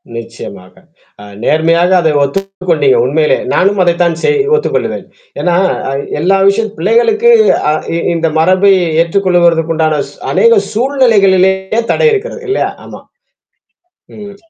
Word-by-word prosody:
நிச்சயமாக. 115 -5 -10 0.5
அ - - -11 0.2
நேர்மையாக 165 +5 +1
அத 160 - +1
ஒத்துக்கொண்டீங்க. 195 - -1
உண்மையிலே. 485 +1 +1 0.2
நானும் 195 +1 +1
அதைத்தான் 170 -1 0
செய் 445 - +1 0.2
ஒத்துக்கொள்ளுவேன். 450 - -3 0.4
ஏன்னா, 175 -1 0 0.3
அ - - -3 0.3
எல்லா 190 +5 +1
விஷயத் 215 +1 -2
பிள்ளைகளுக்கு 240 - +2 0.4
அ - - +1 0.2
இ - - -1 0.2
இந்த 165 -1 -1
மரபை 185 +4 +3 0.3
ஏற்றுக்கொள்வதற்கு 170 -2 +1
உண்டான 155 -2 0
சு - - -18 0.2
அநேக 465 -2 +3
சூழ்நிலைகளிலேயே 205 -5 +1
தடை 470 - +2
இருக்கிறது. 465 +3 -4
இல்லையா! 395 - -1
ஆமா. - - -11 1.1
ம் 205 -1 -11
190 Hz, 120 wpm, -12 LUFS, 170-230 Hz, 1.1 s, மரபை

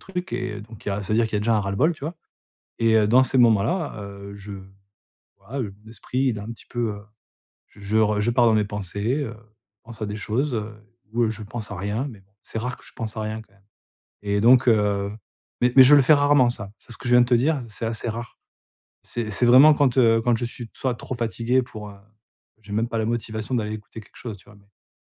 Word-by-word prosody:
trucs». 185 -1 -6
Et 120 -4 -3
donc 110 -1 -14
il - - 0
y 100 - 0
a 100 +1 -3
ça 100 - -3
veut - - +3
dire 115 - +4
qu'il 110 - -7
y - - +3
a - - -2
déjà 115 +1 +2
un - - +2
ras-le-bol, 100 - +1
tu - - -20
vois? 165 +3 -4 0.7
Et, 115 -1 +3
heu, 105 -1 +3
dans 125 +4 +6
ces 130 - 0
moments-là, 120 - +2
heu, 100 0 -9
je 100 0 -9 0.9
voilà, 115 +8 -6
heu, 100 -5 -4
l'esprit, 115 +3 -6
il 110 - -4
est - - -6
un 105 - -7
petit - - -15
peu, 120 -2 -2
heu, 100 - -11 0.7
je 100 - -19
je 100 +2 -2
re 105 -1 +2
je 115 +3 +1
pars 120 0 +4
dans 115 - +5
mes 105 -1 +3
pensées, 105 +3 -3
heu, 115 - -6 0.5
pense 115 -1 -10
à - - -1
des 105 - -5
choses, 120 +6 -1
heu, 105 -1 -4 0.4
ou, 120 - +1
heu, 110 - +1
je 110 0 -7
pense 105 +1 -7
à 100 - -5
rien, 105 +9 -2
mais 105 -5 -13
bon, 95 +1 -30
c'est 115 - -6
rare 125 +2 -3
que - - -18
je - - -12
pense 110 0 -5
à 110 - -2
rien 110 +1 -4
quand 100 - -28
même. 100 -1 -28 0.6
Et 100 0 0
donc, 125 +3 +6
heu, 100 -2 +2 0.5
mais 125 0 +3
mais, 130 - +11
je 145 - +8
le 140 - +6
fais 155 +4 +6
rarement 145 -3 +4
ça, 105 -5 -7
c'est - - -19
ce - - -5
que - - -9
je 120 - +4
viens 125 - +8
de 120 - +1
te 125 - +3
dire, 140 +5 +2
c'est 110 +2 -7
assez 115 +1 -3
rare. 115 +2 -6 0.7
C'est 115 -3 -4
c'est 110 +5 +2
vraiment 135 +5 +8
quand, 135 -4 +2
heu, 115 -3 +5
quand 120 0 +2
je 120 - -2
suis 120 -1 -8
soit 130 -2 -2
trop 125 +2 -6
fatigué 120 +2 0
pour, 105 -3 -9
heu, 100 - -13 0.6
j'ai 100 0 -9
même 115 +2 0
pas 115 - -2
la 110 - 0
motivation 115 +1 -3
d'aller 105 -2 -2
écouter 110 +1 -9
quelque - - -20
chose, 110 -4 -7
tu - - -21
vois, 105 - -17
mais, 100 -10 -27
110 Hz, 265 wpm, -23 LUFS, 105-125 Hz, 0.9 s, mais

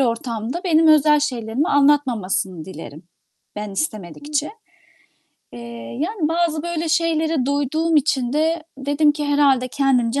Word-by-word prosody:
ortamda 235 - -2
benim 325 -2 +3
özel 300 -1 +5
şeylerimi 250 +1 -2
anlatmamasını 240 - +1
dilerim, 160 -3 -10 0.5
ben 210 -1 -5
istemedikçe. 285 - -3 1.0
Eee, 120 - -9 0.4
yani, 335 -1 -1
bazı 330 -2 0
böyle 335 -1 -3
şeylere 320 -4 +1
duyduğum 290 +4 0
için 265 -4 +1
de 320 +2 0 0.2
dedim 290 +2 +2
ki 300 0 -4
herhâlde 280 -3 +2
kendimce 265 -1 +1
285 Hz, 120 wpm, -20 LUFS, 240-315 Hz, 1.0 s, özel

